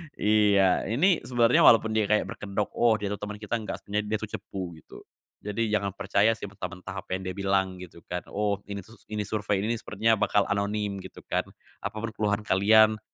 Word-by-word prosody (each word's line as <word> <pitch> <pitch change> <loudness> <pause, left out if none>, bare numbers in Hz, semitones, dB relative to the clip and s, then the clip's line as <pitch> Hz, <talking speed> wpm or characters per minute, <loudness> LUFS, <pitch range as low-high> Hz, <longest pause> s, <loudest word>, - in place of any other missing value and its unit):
Iya, 100 -3 +3
ini 165 - +3
sebenarnya 120 -1 +4
walaupun 110 -1 +6
dia 110 -2 +1
kayak 105 0 +3
berkedok, 105 0 -3
"Oh 115 -2 +4
dia 105 -1 -3
tuh 105 - -4
teman 105 0 -5
kita." 105 +2 -3
Nggak, 110 - -6
sebenernya 105 +1 -2
dia - - +1
tuh 110 -1 -7
cepu 90 -4 -6
gitu. - - -14 0.4
Jadi 105 +2 -2
jangan 100 -2 0
percaya 100 +3 +2
sih 110 - -7
mentah-mentah 95 -1 -7
apa 95 - -4
yang 95 - -5
dia 95 - -3
bilang 95 -2 0
gitu 85 -2 -12
kan, 90 - -2
"Oh, 100 -1 -1
ini 100 -1 -5
tuh 110 +2 -17
s - - -28
ini 105 -1 -3
survei, 105 -1 -1
ini 110 - 0
sepertinya 110 +1 +1
bakal 105 - +3
anonim." 100 0 -1
Gitu - - -11
kan, - - 0 0.3
"Apa - - -5
pun 115 - -3
keluhan 105 0 -1
kalian, 110 +2 +5
105 Hz, 205 wpm, -27 LUFS, 100-110 Hz, 0.4 s, walaupun